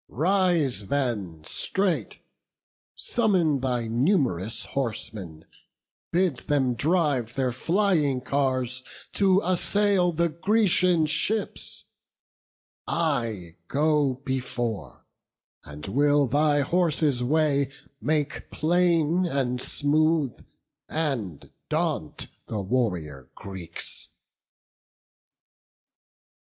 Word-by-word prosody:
Rise 160 - +1
then 105 - -2
straight; 170 - -2 0.7
Summon 185 - +1
thy 125 -3 -1
num'rous 120 - 0
horsemen; 105 - -4 0.7
bid 175 -6 +2
them 130 -4 +1
drive 140 -4 +1
Their 130 -2 +1
flying 160 - +1
cars 130 -2 -1 0.3
to 195 -1 +4
assail 185 0 +2
the 170 +1 +1
Grecian 180 -1 +2
ships: 210 +8 -3 1.0
I 115 - -1
go 145 -3 +1
before: 120 -4 -3 0.6
and 75 +1 -9
will 145 +6 +3
thy 145 +3 +2
horses' 155 -4 +1
way 140 0 +2 0.3
Make 150 -1 -1
plain 170 +1 +2
and 125 -5 -1
smooth, 155 -1 +1 0.5
and 130 - -3 0.2
daunt - - -2 0.2
the 110 - -3
warrior 90 - -2
Greeks." 95 -4 -8
140 Hz, 80 wpm, -26 LUFS, 120-170 Hz, 1.0 s, to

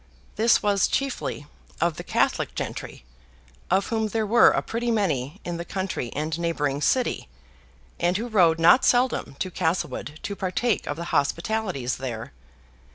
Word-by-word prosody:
This 230 +2 +3
was 200 -1 +3
chiefly 270 - -2 0.3
of 170 -1 +1
the - - -6
Catholic - - 0
gentry, - - -6 0.6
of 190 +2 +2
whom 220 -1 0
there 220 +1 -1
were 235 +3 +6
a - - 0
pretty 235 +1 -2
many 170 - 0
in 175 -1 -3
the 170 - -4
country 185 - -4
and 155 +2 -2
neighboring 150 -4 -1
city; 255 - +1 0.7
and 175 +2 +2
who 230 +3 -3
rode 175 -8 +4
not 175 +10 +6
seldom 245 - +2
to 185 - -3
Castlewood 160 -3 -2
to 200 - -4
partake 195 +4 -1
of 145 - -3
the 170 - -4
hospitalities 170 - 0
there. 125 -1 -6
180 Hz, 155 wpm, -25 LUFS, 150-220 Hz, 0.7 s, were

